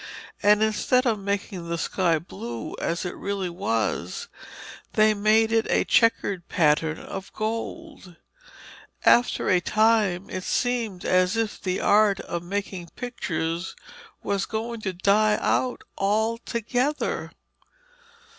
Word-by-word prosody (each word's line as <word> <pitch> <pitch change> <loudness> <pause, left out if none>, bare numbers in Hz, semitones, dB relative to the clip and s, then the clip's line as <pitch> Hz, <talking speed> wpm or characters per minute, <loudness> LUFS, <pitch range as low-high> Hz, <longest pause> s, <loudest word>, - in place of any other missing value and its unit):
And 210 +1 +5
instead 235 +4 +2
of 225 -4 +1
making 195 -3 -3
the 170 - -1
sky 170 0 +1
blue 120 -8 -7
as 170 +2 -1
it 180 - -4
really 195 -3 -3
was, 110 - -2 0.6
they 215 0 +5
made 215 +2 +3
it 225 0 +2
a - - +3
chequered 200 -6 +2
pattern 160 0 +2
of 195 0 -8
gold. 225 - -5 0.9
After 240 +1 +4
a 185 - +4
time 215 -3 +2
it 185 - -5
seemed 230 -7 -1
as 185 +3 +2
if 225 -2 -2
the 185 -1 -1
art 205 -1 +4
of 170 - -4
making 190 -1 -4
pictures 175 -8 -3 0.5
was 200 -1 -1
going 230 +1 -4
to 190 -3 -3
die 210 +3 +3
out 255 +1 0 0.2
altogether. 230 +6 -1
200 Hz, 120 wpm, -25 LUFS, 180-225 Hz, 0.9 s, And